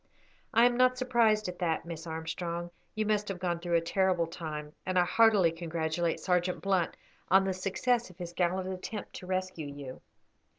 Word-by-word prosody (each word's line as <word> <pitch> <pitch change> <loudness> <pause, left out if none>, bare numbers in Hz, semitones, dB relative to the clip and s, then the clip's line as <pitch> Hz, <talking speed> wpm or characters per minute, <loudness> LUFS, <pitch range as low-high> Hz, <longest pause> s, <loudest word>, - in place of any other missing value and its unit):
"I 235 - +6
am 245 0 +3
not 255 0 +4
surprised 235 -5 +3
at 180 0 -6
that, 165 -2 0
Miss 170 -1 -7
Armstrong. 170 +2 -4 0.2
You 215 0 0
must 210 -1 +1
have 195 - -3
gone 175 -1 -1
through 170 0 -1
a 165 - +4
terrible 180 0 +2
time, 155 -2 -6
and 185 0 -1
I 180 - +5
heartily 205 -3 +5
congratulate 165 0 -1
Sergeant 180 -1 +1
Blunt 190 -4 0 0.3
on 190 +2 +6
the 190 - 0
success 230 +6 0
of 180 - -16
his 175 -1 -6
gallant 185 +1 0
attempt 200 +3 -6
to 180 - -9
rescue 185 -4 -2
you." 140 -2 -8
180 Hz, 180 wpm, -30 LUFS, 170-195 Hz, 0.3 s, I